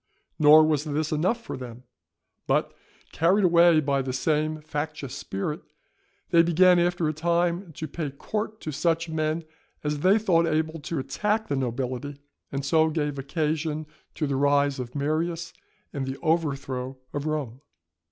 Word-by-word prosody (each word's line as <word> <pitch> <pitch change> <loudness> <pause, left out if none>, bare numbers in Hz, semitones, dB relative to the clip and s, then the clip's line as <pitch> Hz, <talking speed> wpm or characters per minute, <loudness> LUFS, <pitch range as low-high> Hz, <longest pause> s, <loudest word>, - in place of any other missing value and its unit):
Nor 155 +1 +8
was 150 -2 +1
this 155 0 -2
enough 180 +10 +1
for - - -5
them, 125 -1 -9 0.6
but, - - +1 0.4
carried 185 +5 +3
away 170 -2 +6
by 140 -2 +1
the 130 -1 -3
same 155 +3 0
factious 150 -3 -5
spirit, 150 - -4 0.7
they 170 -2 +7
began 175 +2 +5
after 175 -1 +1
a 155 - 0
time 170 +3 0
to 155 - -5
pay 155 0 -4
court 215 +10 -4
to 155 - -4
such 165 +3 0
men 155 +1 -1 0.4
as 150 0 -1
they 190 +7 +4
thought 170 -6 +2
able 160 0 -1
to 155 +2 -4
attack 210 +11 -1
the 140 - 0
nobility, 130 +2 -3 0.3
and 140 0 -3
so 160 +2 +3
gave 150 -3 -2
occasion 155 +2 -2 0.3
to 155 - -1
the 140 -1 -1
rise 140 0 +2
of 125 +1 -6
Marius 165 +4 -1 0.4
and 135 -2 -3
the 135 +1 -4
overthrow 140 -5 -1 0.2
of 145 +1 -3
Rome. 140 -5 -3
155 Hz, 155 wpm, -26 LUFS, 140-165 Hz, 0.7 s, Nor